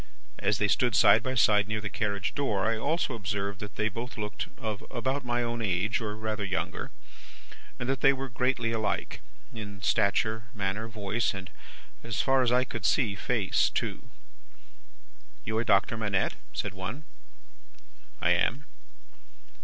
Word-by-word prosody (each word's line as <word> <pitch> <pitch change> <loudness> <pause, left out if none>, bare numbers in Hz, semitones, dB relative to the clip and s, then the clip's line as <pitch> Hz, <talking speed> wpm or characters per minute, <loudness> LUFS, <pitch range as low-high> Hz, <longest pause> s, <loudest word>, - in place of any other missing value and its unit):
As 105 - +2
they 105 - +2
stood 120 +3 +2
side - - +7
by 130 0 -2
side 105 -3 +4
near 110 0 -1
the 105 - -4
carriage 100 -2 -1
door, 105 -9 0
I 115 +1 +2
also 145 +4 0
observed 100 -1 -3
that 105 -1 -7
they 110 - +1
both 115 +4 -5
looked 105 0 -3
of 110 -2 -4
about 130 +3 -1
my 120 0 0
own 120 0 -2
age, 105 +3 +1
or 105 -1 -3
rather 110 -1 -3
younger, 95 -1 -2 0.9
and 120 - -4
that 135 0 0
they 135 - +7
were 135 0 -3
greatly 125 -1 0
alike, 110 -1 -2 0.3
in 105 -3 -7
stature, 110 +3 +2
manner, 100 +2 -1
voice, 110 0 -1
and 95 -1 -7 0.5
(as 115 -2 -3
far 135 -1 +4
as 125 -2 +3
I 125 +1 +4
could 115 -5 -6
see) 115 -8 +2
face 100 -1 +1
too. - - -3 1.4
"'You 110 +1 0
are - - +1
Doctor 100 +1 +3
Manette?' 105 -4 +1 0.2
said 100 - -3
one. 100 +10 -5 1.2
"I - - +3
am." 140 +5 +2
110 Hz, 160 wpm, -29 LUFS, 100-120 Hz, 1.4 s, side